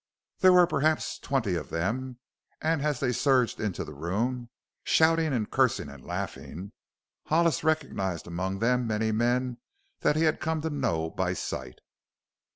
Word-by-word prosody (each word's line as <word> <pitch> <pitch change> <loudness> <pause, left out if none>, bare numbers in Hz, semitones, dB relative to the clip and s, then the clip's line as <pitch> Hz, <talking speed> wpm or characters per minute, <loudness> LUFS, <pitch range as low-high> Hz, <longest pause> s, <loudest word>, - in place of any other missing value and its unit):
There 185 -1 +7
were 180 -1 +7
perhaps 155 -1 0
twenty 130 -9 0
of 85 - -3
them 120 +9 -2 0.4
and 160 -1 0
as 150 -3 0
they 130 -3 +1
surged 125 -1 +2
into 105 -5 -2
the 75 - -9
room, 115 - -2 0.3
shouting 160 -1 +3
and 115 -5 0
cursing - - +1
and 70 -3 -12
laughing 95 +5 -6 0.6
Hollis 165 -2 +2
recognized 95 - -1
among 95 +3 -3
them 125 +3 +1
many 110 0 0
men 120 +2 0 0.4
that 150 - +2
he 155 - +2
had 155 -1 +2
come 160 0 -1
to 160 +1 -2
know 95 - -1
by 95 -1 -1
sight. - - -5
125 Hz, 155 wpm, -28 LUFS, 95-155 Hz, 0.6 s, There